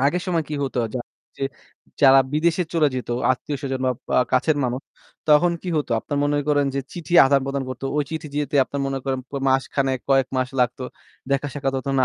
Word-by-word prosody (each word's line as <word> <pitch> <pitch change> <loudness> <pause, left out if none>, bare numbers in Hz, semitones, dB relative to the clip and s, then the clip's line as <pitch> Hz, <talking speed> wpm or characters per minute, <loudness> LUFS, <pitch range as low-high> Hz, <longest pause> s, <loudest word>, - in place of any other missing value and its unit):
আগের 145 +7 +2
সময়ে 170 -4 0
কী 150 - -3
হতো? 130 -2 -3 0.2
যারা 120 -1 -4 0.3
যে 135 - -1 0.6
যারা 135 -1 +8
বিদেশে 165 +3 +2
চলে 160 -3 +3
যেত 125 - -4 0.2
আত্মীয়-স্বজন 135 0 -4
বা - - +3 0.2
পা - - +1 0.2
কাছের 140 +4 +3
মানুষ, 125 +1 -1 0.5
তখন 155 +4 +5
কী 185 - -5
হতো? 150 - -1
আপনার 145 - -3
মনে 145 0 +1
করেন 145 -1 +3
যে 140 - 0
চিঠি 170 -1 -7
আদান-প্রদান 135 0 +1
করতো। 130 +1 -6
ওই 150 - +2
চিঠি 160 -1 -4
যেতে 145 -1 -1
আপনার 140 +2 -5
মনে 135 0 -2
করেন 135 -1 -1
প - - -39 0.2
মাসখানেক 135 0 +1
কয়েক 135 -2 +4
মাস 130 0 0
লাগতো। 125 +1 0 0.5
দেখা-সাক্ষাৎ 140 0 -1
হতো 135 +1 -4
না। 130 - +4
140 Hz, 195 wpm, -23 LUFS, 130-150 Hz, 0.6 s, যারা